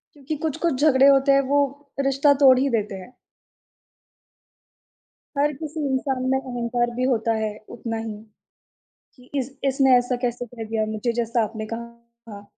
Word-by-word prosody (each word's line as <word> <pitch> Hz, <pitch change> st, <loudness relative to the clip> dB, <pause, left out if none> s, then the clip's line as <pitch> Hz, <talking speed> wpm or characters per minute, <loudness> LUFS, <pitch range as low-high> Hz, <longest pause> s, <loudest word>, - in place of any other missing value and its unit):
क्योंकि 290 Hz, +2 st, -5 dB
कुछ-कुछ 315 Hz, -2 st, -1 dB
झगड़े 275 Hz, -3 st, +5 dB
होते 275 Hz, 0 st, +5 dB
हैं 275 Hz, -, +5 dB
वो 285 Hz, +1 st, +3 dB, 0.4 s
रिश्ता 275 Hz, +1 st, +3 dB
तोड़ 260 Hz, -2 st, +7 dB
ही 275 Hz, +2 st, +2 dB
देते 215 Hz, -4 st, -1 dB
हैं। 190 Hz, +6 st, -10 dB, 2.2 s
हर 290 Hz, +1 st, +2 dB
किसी 310 Hz, +1 st, -6 dB
इंसान 265 Hz, 0 st, -1 dB
में 265 Hz, -, +2 dB
अहंकार 240 Hz, -2 st, -2 dB
भी 255 Hz, -, 0 dB
होता 225 Hz, 0 st, 0 dB
है, 210 Hz, -1 st, -4 dB
उतना 230 Hz, -1 st, -5 dB
ही 225 Hz, -1 st, -5 dB, 1.0 s
कि 250 Hz, -1 st, -19 dB
इस 260 Hz, 0 st, -3 dB
इसने 270 Hz, -1 st, +4 dB
ऐसा 245 Hz, +1 st, -1 dB
कैसे 245 Hz, 0 st, -2 dB
कह 230 Hz, -1 st, -8 dB
दिया 220 Hz, 0 st, -1 dB
मुझे, 215 Hz, +2 st, -2 dB
जैसा 235 Hz, 0 st, 0 dB
आपने 215 Hz, 0 st, -6 dB
कहा 235 Hz, +1 st, -4 dB, 0.5 s
था। 200 Hz, 0 st, -9 dB
250 Hz, 160 wpm, -23 LUFS, 230-275 Hz, 2.2 s, तोड़